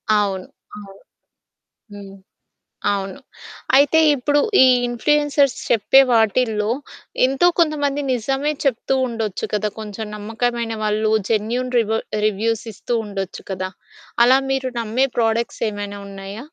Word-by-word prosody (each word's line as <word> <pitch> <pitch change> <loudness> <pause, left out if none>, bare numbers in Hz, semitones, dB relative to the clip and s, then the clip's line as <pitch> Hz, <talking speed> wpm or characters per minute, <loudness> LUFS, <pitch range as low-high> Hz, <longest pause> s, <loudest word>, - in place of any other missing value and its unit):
అవును. 195 -3 0 0.3
అవును. 195 -1 -13 0.9
హ్మ్. 200 -1 -10 0.8
అవును. 195 +5 -4 0.6
అయితే 290 +4 +5 0.2
ఇప్పుడు, 290 +2 +1 0.2
ఈ - - +8 0.2
ఇన్‌ఫ్లుయెన్సర్స్ 285 +2 +2
చెప్పే 235 +4 +5
వాటిలో, 220 -1 +2 0.6
ఎంతో 270 +6 +2
కొంతమంది 290 -3 +1
నిజమే 270 +5 -1
చెప్తూ 265 0 0
ఉండొచ్చు 225 -5 -3
కదా! 210 0 0
కొంచెం 215 0 -6
నమ్మకమైన 225 +2 -2
వాళ్ళు 215 +1 0 0.2
జెన్యూన్ 235 +3 -1
రివా 225 -1 +1 0.3
రివ్యూస్ 215 +2 0
ఇస్తూ 235 +4 -3
ఉండొచ్చు 195 -2 -6
కదా! 185 0 -3 0.5
అలా 255 +2 +6
మీరు 265 -1 -1
నమ్మే 235 +4 0
ప్రొడక్ట్స్ 230 +1 0
ఏమైనా 205 -1 -6
ఉన్నాయా? 195 +2 -8
225 Hz, 115 wpm, -20 LUFS, 205-260 Hz, 0.9 s, ఈ